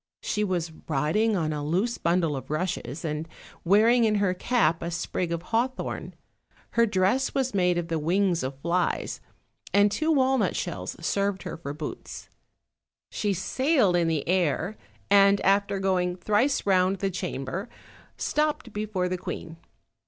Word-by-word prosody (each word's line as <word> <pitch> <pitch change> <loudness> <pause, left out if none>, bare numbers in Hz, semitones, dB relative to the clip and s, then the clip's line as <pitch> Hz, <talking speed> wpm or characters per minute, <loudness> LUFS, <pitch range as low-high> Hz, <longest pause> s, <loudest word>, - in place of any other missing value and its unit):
She 210 - 0
was 175 -5 -1 0.2
riding 165 +10 +1
on 155 -3 -1
a 150 -1 -3
loose 190 +10 0
bundle 170 -3 +1
of 135 - -7
rushes, 155 -3 -3
and 155 +1 -3 0.3
wearing 220 +6 +5
in 215 -1 +3
her 200 -3 +2
cap 180 -5 +1
a 170 - -3
sprig 175 0 -2
of 170 0 -2
haw 230 +6 +1
thorn; 255 - -6 0.6
her 235 0 +3
dress 205 +7 +1
was 265 -2 0
made 180 -2 +2
of 170 -1 -2
the 165 -2 -1
wings 175 +2 +1
of 130 +1 -4
flies, 175 +2 -1 0.5
and 205 0 +5
two 310 +10 0
walnut 265 -3 +2
shells - - -4
served 200 -2 0
her - - -5
for 160 -4 -6
boots; 150 0 -7 0.8
she 205 - -1
sailed 205 - +2
in 170 -1 +2
the 160 -3 -1
air, 180 +2 +1 0.4
and 200 0 +6
after 200 0 +2
going 185 -2 0
thrice 215 +9 +1
round 190 0 +3
the 195 0 -1
chamber 180 - -4 0.5
stopped 300 -6 -1
before 210 -3 -1
the 180 0 -3
queen. 165 -1 -6
185 Hz, 155 wpm, -26 LUFS, 170-210 Hz, 0.8 s, and